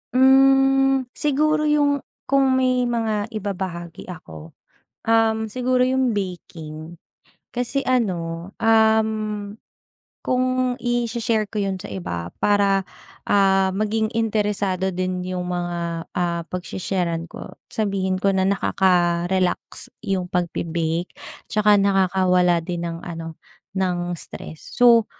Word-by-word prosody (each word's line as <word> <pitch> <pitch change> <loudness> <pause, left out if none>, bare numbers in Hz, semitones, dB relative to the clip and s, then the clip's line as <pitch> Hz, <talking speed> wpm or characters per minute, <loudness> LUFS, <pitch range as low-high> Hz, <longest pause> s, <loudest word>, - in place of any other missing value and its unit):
Mm 270 0 +5
siguro 305 +1 +1
yung 290 -1 +3 0.2
kung 270 -1 +3
may 255 -1 +2
mga 220 -3 -1
ibabahagi 190 -5 -5
ako, 80 - -10 0.5
um, 225 -1 +3
siguro 255 +2 +1
yung 255 -2 +2
baking. 170 -4 -6 0.6
Kasi 250 +3 -1
ano, 175 -8 -1
um, 220 0 +4 1.2
kung 255 0 +1
i-shi-share 235 -2 0
ko 210 -2 -2
yun 195 -1 -1
sa - - -9
iba 85 -3 -5
para, 200 -1 +3 0.5
ah, 195 -1 +4
maging 215 +1 0
interesado 205 -4 0
din 185 0 -2
yung 180 -1 -3
mga, 170 -1 -3
ah, 170 -1 0
pag-shesharan 180 -2 -3
ko - - -9 0.2
sabihin 195 -3 -1
ko 195 +1 +1
na 190 0 +2
nakaka-relax 180 +1 +1
yung 195 -4 -1
pag-bebake. 170 -1 -2 0.4
Tsaka 210 -1 +4
nakakawala 185 -2 +3
din 170 0 -4
ng 165 0 -7
ano 165 -2 -7 0.4
ng 175 -2 -1
stress. 160 0 -8
So, 235 -2 +6
195 Hz, 105 wpm, -22 LUFS, 175-235 Hz, 1.2 s, So